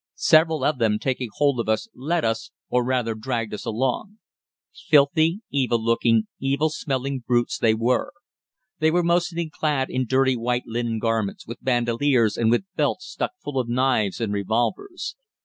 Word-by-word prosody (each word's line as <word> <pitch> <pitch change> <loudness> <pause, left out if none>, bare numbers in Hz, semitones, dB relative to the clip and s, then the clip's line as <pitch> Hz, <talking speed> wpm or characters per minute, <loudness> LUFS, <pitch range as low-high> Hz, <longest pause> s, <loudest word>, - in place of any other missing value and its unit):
Several 160 0 +4
of 150 -4 +1
them 110 -2 +2
taking 125 0 -2
hold 140 -4 +1
of 115 - -2
us 110 - 0
led 160 +4 -1
us 115 0 -1 0.2
or 125 0 +2
rather 125 -2 0
dragged 115 -1 -3
us 105 - -6
along. 130 - -2 0.6
Filthy, 160 +6 +3
evil 130 -4 +1
looking, 115 0 +2 0.2
evil 140 +3 +1
smelling 135 -2 -2
brutes 120 -1 0
they 110 -1 +3
were. 120 +3 0 0.7
They 155 - +3
were 175 +2 +2
mostly 170 -1 0
clad 145 -4 -1
in 130 -1 -1
dirty 130 +1 +3
white 120 +1 -1
linen 115 0 -2
garments, 110 -3 -1
with 115 +2 -9
bandoliers 120 -1 +2
and 115 -1 +1
with 120 +10 +2
belts - - 0
stuck - - -4
full 135 -2 -2
of 120 -2 -2
knives 125 -5 +1
and 110 -3 -1
revolvers. 120 - -2
125 Hz, 165 wpm, -23 LUFS, 115-145 Hz, 0.7 s, Several